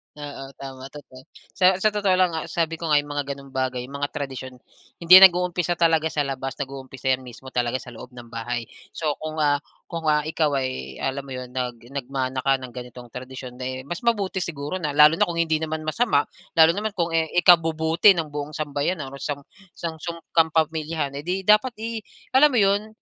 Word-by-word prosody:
Oo, 145 -2 -8
tama, 135 -1 -9
totoo. 135 -2 -13 0.2
Sa 185 0 +4
sa 215 +4 +2
totoo 205 -3 +2
lang 185 -2 +3
nga, 160 -1 -4
sabi 165 -1 -2
ko 165 - -4
nga 150 - +3
yung 145 - -10
mga 140 -1 -3
ganong 140 -1 -14
bagay, 130 -1 -2
mga 140 +2 -4
tradisyon, 130 -3 -5 0.4
hindi 170 +1 +4
yan 195 - +12
nag-uumpisa 175 -1 -1
talaga 165 -2 +3
sa 150 -2 -1
labas 135 -1 -4
nag-uumpisa 135 -1 -4
'yan 130 - +1
mismo 130 +1 -11
talaga 120 -1 0
sa 125 - -11
loob 125 +2 -12
ng 120 -1 -12
bahay. 115 +1 -3 0.3
So 155 -2 -1
kung, 155 0 -5
ah 145 -1 +3 0.3
kung, 165 -2 -4
ah, 150 -1 +3
ikaw 155 -2 0
ay 65 - -3
alam 135 +1 -1
mo 130 - -6
'yon 125 -1 -7
nag 125 -2 -4
nagmana 135 -1 -3
ka 135 +1 +3
ng 130 -1 -8
ganitong 125 -1 -10
tradisyon, 130 0 -9
di 130 0 -4
mas 170 +6 -5
mabuti 200 -5 +1
siguro 160 0 -4
na 150 -4 -3
lalo 150 +2 +7
na - - +4
kung 170 - -4
hindi 160 -2 +1
naman 160 0 -3
masama, 155 -1 +2 0.3
lalo 160 0 +7
naman 210 +3 -3
kung, 170 -2 -1
eh, 165 -1 +1
ikabubuti 165 +1 +5
ng 160 -3 -3
buong 145 +1 -5
sambayanan 145 0 -2
o 140 - -9
sang 145 -1 -4 0.3
sang 165 -2 -5
song 170 0 -6
kapamilyahan 160 -2 +1
eh, 150 - -11
'di 190 +2 -1
dapat, 215 +5 +4
eh 225 +1 -4 0.3
alam 270 0 +5
mo - - +4
'yon, 200 +2 +2
150 Hz, 205 wpm, -24 LUFS, 130-170 Hz, 0.4 s, yan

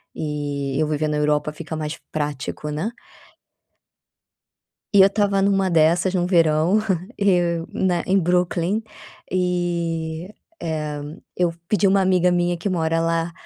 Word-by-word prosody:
e 145 -2 -3
eu 155 - +1
viver 155 0 -1
na 150 0 -1
Europa 150 0 +1
fica 160 0 -6
mais 155 0 -4
prático, 150 0 -3
né? 155 +8 -2 2.0
E 200 - +6
eu 190 - +8
estava 200 -1 +1
numa 195 -1 +2
dessas 170 +3 +3
no 175 -2 +1
verão, 165 +2 +3 0.4
eu, 175 -4 +2
né, 180 -3 0
em 195 +1 +3
Brooklyn 180 +3 0 0.5
e, 170 -2 -1 0.3
eh, 155 -2 -3 0.4
eu 175 -2 +1 0.2
pedi 200 -2 +3
uma 195 +1 +4
amiga 185 -1 +3
minha 175 0 +1
que 170 - -4
mora 165 -3 0
lá 165 0 0
170 Hz, 135 wpm, -22 LUFS, 155-185 Hz, 2.0 s, eu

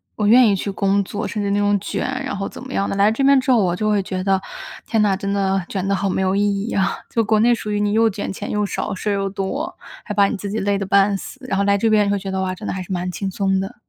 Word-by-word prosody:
我 210 - 0
愿 240 +2 +7
意 205 - +3
去 195 - -3
工 200 +1 +1
作， 205 +3 -4
甚 215 - -3
至 200 - -1
那 200 - +1
种 205 0 +2
卷， - - -3 0.2
然 260 -1 -3
后 195 - -3
怎 - - -10
么 265 - -9
样 195 - 0
的。 - - -2
来 200 +2 +4
这 230 +5 -1
边 275 0 +6
之 260 - +1
后， 250 - +5
我 175 -1 +1
就 215 +3 -1
会 205 -2 +2
觉 185 -1 -4
得： 195 0 +2 0.5
“天 225 -2 +1
呐， 200 -2 +2
真 200 0 -3
的 195 -1 0
卷 195 -1 -3
得 200 - +2
好 195 +1 -1
没 190 - -1
有 190 0 +1
意 200 - +2 0.3
义 - - -4
啊。” 190 -2 0
就 230 - +1
国 215 0 +2
内 240 +2 +4
属 215 -2 -5
于 205 - 0
你 205 0 +1
又 225 +1 +4
卷 205 0 -4
钱 200 +2 -6
又 210 0 0
少， - - -3
事 190 +3 -3
儿 - - +2
又 195 0 -1
多。 210 - -4 0.3
还 210 - -5
把 200 -1 +4
你 215 - -3
自 200 0 -5
己 220 - -1
累 200 0 0
得 195 - -3
半 200 +1 +3
死， 270 - -10
然 195 - -1
后 200 - +2
来 200 0 +3
这 225 +3 +1
边 210 -2 +3
会 200 - 0
觉 195 0 -6
得： 190 0 -2
“哇， 185 0 -2
真 185 - -8
的 - - -2
还 185 0 -4
是 180 - -10
蛮 180 0 -2
轻 195 +1 -4
松 195 0 0
的。” 195 +5 -5
200 Hz, 345 characters per minute, -20 LUFS, 195-215 Hz, 0.5 s, 愿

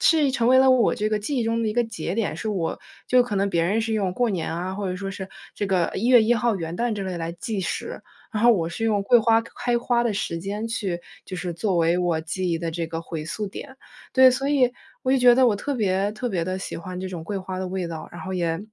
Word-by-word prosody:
是 320 -3 +4
已 275 - +3
成 245 -3 +1
为 260 +1 +6
了 265 0 +6
我 255 -4 +4
这 215 - -1
个 215 - +1
记 240 +8 -3
忆 240 - +1
中 230 0 0
的 220 - 0
一 - - -1
个 240 0 +2
节 210 -5 -4
点， 220 -8 -1
是 215 - -4
我 185 -6 -2 0.3
就 250 0 +5
可 230 -4 -3
能 200 +1 +1
别 170 -2 +2
人 195 +6 +1
是 225 0 -2
用 200 -4 0
过 245 -2 +1
年 180 -5 -2
啊， 180 +3 -3
或 200 -1 -3
者 180 - -3
说 195 +1 -4
是 195 -1 -7 0.3
这 205 - -2
个 185 -3 +1
1 220 +5 -1
月 245 -2 +7
1 220 +2 +3
号 235 -3 +1
元 165 -1 -4
旦 235 +1 0
之 200 - -4
类 185 -2 -4
来 165 0 -3
计 195 +4 -4
时， 185 - -4 0.3
然 215 0 -1
后 240 - +7
我 170 -6 0
是 225 +7 -4
用 210 -3 +2
桂 240 +5 +5
花 225 0 +3
开 240 +1 -2
花 240 0 +1
的 230 - +1
时 170 -4 -2
间 205 +5 -4
去 195 -7 -2 0.3
就 185 - -6
是 180 0 -3
作 185 +2 -1
为 170 +1 +3
我 170 -3 +1
记 180 +3 -3
忆 165 - +1
的 165 0 -3
这 165 0 -3
个 165 0 -4
回 160 -2 -5
溯 210 +5 -3
点。 265 +6 -9 0.4
对， 260 -1 +7
所 270 +3 -1
以 260 -4 +3 0.3
我 260 - +2
就 270 - +4
觉 245 -1 +7
得 260 0 +5
我 225 - +3
特 285 +7 -3
别 200 -3 +1
特 245 +3 -3
别 175 -4 -1
地 185 +2 -3
喜 190 - -5
欢 180 +2 -7
这 190 - -4
种 175 -3 -6
桂 205 +3 -3
花 185 0 -5
的 185 0 -3
味 185 -1 -3
道， 160 -1 -7
然 175 - -8
后 190 - -5
也 165 -2 0
200 Hz, 300 characters per minute, -24 LUFS, 180-235 Hz, 0.4 s, 月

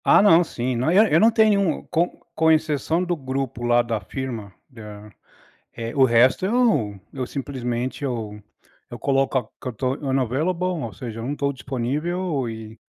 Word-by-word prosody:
Ah - - +6
não, 180 -4 +6
sim, 125 -5 -3
não 125 +6 0
é 210 +6 +4
eu - - +6
não 225 - +6
tenho 220 -1 +4
nenhum 180 -6 0
com 170 +1 -1
com 160 -1 +3
exceção 155 +2 +1
do 175 -1 -1
grupo 135 -3 -4
lá 120 0 +4
da 115 -2 -2
firma, 115 -8 -6 0.2
da 105 -4 -11 0.6
Eh, 115 0 -6
o 135 - +5
resto 125 +6 +4
eu 190 - +1
eu 130 -2 -3
simplesmente 130 -1 -4
eu 110 -5 -4 0.5
eu 120 - -7
coloco 135 0 0
que - - -5
eu - - -4
tô 130 +3 -1
unavailable, 140 +6 -1 0.2
ou 115 - -6
seja, 115 +2 -7
eu - - -5
não 135 - -2
estou 140 -1 -1
disponível 140 +3 -2
e, 110 0 -9
130 Hz, 175 wpm, -23 LUFS, 120-160 Hz, 0.6 s, Ah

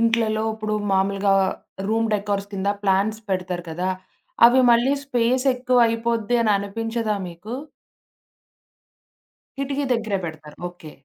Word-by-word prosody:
ఇంట్లలో 225 -1 +2
ఇప్పుడు 215 -1 -3 0.2
మామూలుగా 195 +1 +2 0.5
room 225 +1 +1
decors 200 -1 -2
కింద 195 0 -2
ప్లాంట్స్ 200 +2 +1
పెడతారు 180 -2 -2
కదా! 180 +3 -2 0.6
అవి 255 +2 +5
మళ్ళీ 240 +4 +3
స్పేసెక్కువయిపోద్ది 245 -2 +2
అననిపించదా 215 +2 0
మీకు? 180 +7 -8 2.0
కిటికీ 275 +1 -1
దెగ్గెరే 220 -4 0
పెడతారు. 155 -2 -8
ఓకే. 175 -3 -12
215 Hz, 100 wpm, -23 LUFS, 195-235 Hz, 2.0 s, అవి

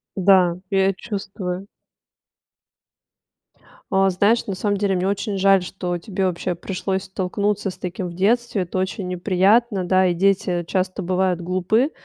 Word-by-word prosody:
Да, 185 -2 +4
я 195 0 +3
чувствую. 195 -2 -5 2.2
А, 195 0 +4
знаешь, 205 +6 +2
на 195 - -2
самом 205 +1 -1
деле 195 -1 +1
мне 180 +1 0
очень 200 0 -2
жаль, 195 -1 +4
что 180 -1 -4
тебе 190 +2 -3
вообще 180 0 -2
пришлось 190 +2 -3
столкнуться 195 +2 -2
с - - -8
таким 180 0 -5
в - - -9
детстве. 225 +3 +1
Это 180 +1 -5
очень 190 0 -3
неприятно, 190 +3 +2
да, 185 +1 +3
и 175 - +2
дети 180 -1 +1
часто 185 +1 -1
бывают 185 0 0
глупы. 185 - +1
190 Hz, 145 wpm, -22 LUFS, 180-200 Hz, 2.2 s, Да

